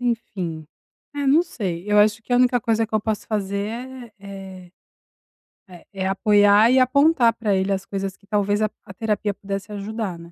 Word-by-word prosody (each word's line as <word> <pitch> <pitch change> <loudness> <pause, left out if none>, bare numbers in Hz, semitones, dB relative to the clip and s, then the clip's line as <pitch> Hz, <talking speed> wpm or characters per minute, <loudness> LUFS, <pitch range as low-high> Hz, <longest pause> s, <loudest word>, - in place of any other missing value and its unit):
enfim, 190 -10 -3 0.5
é, 285 -1 -2
não 295 +5 +5
sei. 190 - -5
Eu 210 - +4
acho 210 +1 +3
que 245 - -6
a 245 - +4
única 245 -1 +3
coisa 225 0 0
que 220 - -8
eu 215 - +3
posso 215 0 -3
fazer 200 -2 -2
é 245 0 -8
é 195 -2 -10 1.0
é 175 -2 -14
é 190 -1 -2
apoiar 205 +2 +4
e 260 - +5
apontar 260 -2 +4
pra 215 -4 -1
ele 190 +1 0
as 195 0 -2
coisas 195 -1 -4
que 200 - -27
talvez 205 0 0
a 215 - +1 0.2
a 195 - -11
terapia 210 -1 -1
pudesse 200 +1 -6
ajudar, 205 -2 -4
né. 170 0 -13
210 Hz, 190 wpm, -22 LUFS, 195-230 Hz, 1.0 s, não